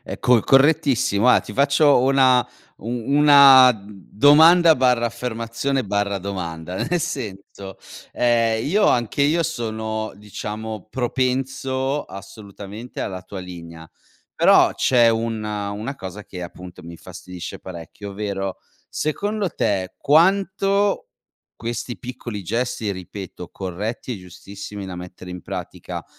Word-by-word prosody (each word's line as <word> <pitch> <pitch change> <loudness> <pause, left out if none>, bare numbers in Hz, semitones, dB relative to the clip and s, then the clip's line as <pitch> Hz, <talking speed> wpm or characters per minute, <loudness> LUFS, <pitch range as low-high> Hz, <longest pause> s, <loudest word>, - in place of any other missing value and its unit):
È - - -7
co 125 -1 +4
è - - 0
correttissimo, 135 -6 +3
guarda, 125 +1 +5
ti - - -10
faccio 140 0 +4
una 130 -1 +4 0.4
u 110 - -8
una 135 +1 +6
domanda/affermazione/domanda 115 - +2
nel 165 +8 -1
senso, 100 - -6 0.4
ehm, 115 -2 +1
io 205 +7 +2
anche 120 +3 +1
io 160 +4 +2
sono 110 -6 -4
diciamo 105 0 -7
propenso 130 +2 -1
assolutamente 100 +3 -10
alla 95 -1 -4
tua 95 +1 -9
linea. 85 -3 -10 0.5
Però - - +5
c'è 120 -3 +4
un 115 -1 -2
una 105 +4 -4
cosa 95 +2 -8
che 90 -2 -8
appunto 90 0 -10
mi 85 - -10
infastidisce 90 +1 -9
parecchio, 95 +3 -9
ovvero, 95 -1 -4 0.3
secondo 205 +6 -2
te 95 -9 -2
quanto 195 +6 +2 0.5
questi 120 +1 -5
piccoli 120 -4 -7
gesti, 115 +1 -2
ripeto, 95 -1 -8
corretti 105 +7 -5
e 100 - -9
giustissimi 100 +3 -9
da 90 -2 -7
mettere 90 0 -10
in 90 -1 -8
pratica, - - -7
115 Hz, 110 wpm, -21 LUFS, 95-135 Hz, 0.5 s, una